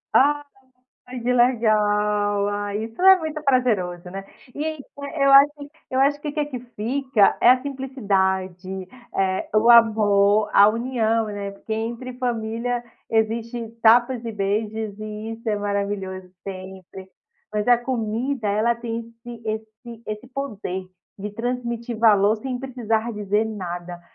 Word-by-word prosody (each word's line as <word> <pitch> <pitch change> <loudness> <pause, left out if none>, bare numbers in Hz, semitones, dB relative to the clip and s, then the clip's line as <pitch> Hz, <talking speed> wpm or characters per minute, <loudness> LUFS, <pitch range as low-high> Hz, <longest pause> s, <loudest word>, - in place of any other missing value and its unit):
Ah, 290 +2 +4 0.6
ai 250 -1 -7
que 250 +2 0
legal! 210 -4 +2
Ah, 205 0 -3
isso 225 +6 -5
é 380 0 +8
muito 315 -3 -4
prazeroso, 190 -10 +1
né? 195 +1 -6 0.3
E, 295 - -4
eh, 280 -1 -4
eu 275 - +5
acho 280 +2 +8 0.4
eu 260 +1 0
acho 285 +1 +3
que 300 - -5
o - - -3
que 300 -1 0
que 260 -4 -5 0.2
fica 245 -1 +2
é 245 - +7
a 255 0 +4
simplicidade, 190 -9 -2 0.3
eh, 190 -1 0
o 225 +3 +5
amor, 210 -2 +5
a 205 +1 +7
união, 230 -1 0
né, 200 -1 -5
porque 220 +2 -8
entre 235 +3 -4
família 240 0 -2 0.3
existe 225 +1 -1
tapas 240 +1 +4
e 230 - -4
beijos 210 +1 -2
e 215 +1 -6
isso 230 0 -7
é 210 - +2
maravilhoso 200 -2 -3
sempre. 190 0 -9 0.4
Mas 210 +2 -1
a 245 - +6
comida 240 0 -2
ela 220 +4 +2
tem 230 -1 -4 0.3
esse 235 -1 -9
esse 220 +2 -6
esse 215 +3 -6
poder 210 -9 -5 0.3
de 205 +1 -5
transmitir 235 +1 -3
valor 210 -2 +5
sem 250 +2 -4
precisar 235 -3 -2
dizer 210 +1 0
nada. 175 -4 -6
220 Hz, 145 wpm, -23 LUFS, 205-245 Hz, 0.6 s, é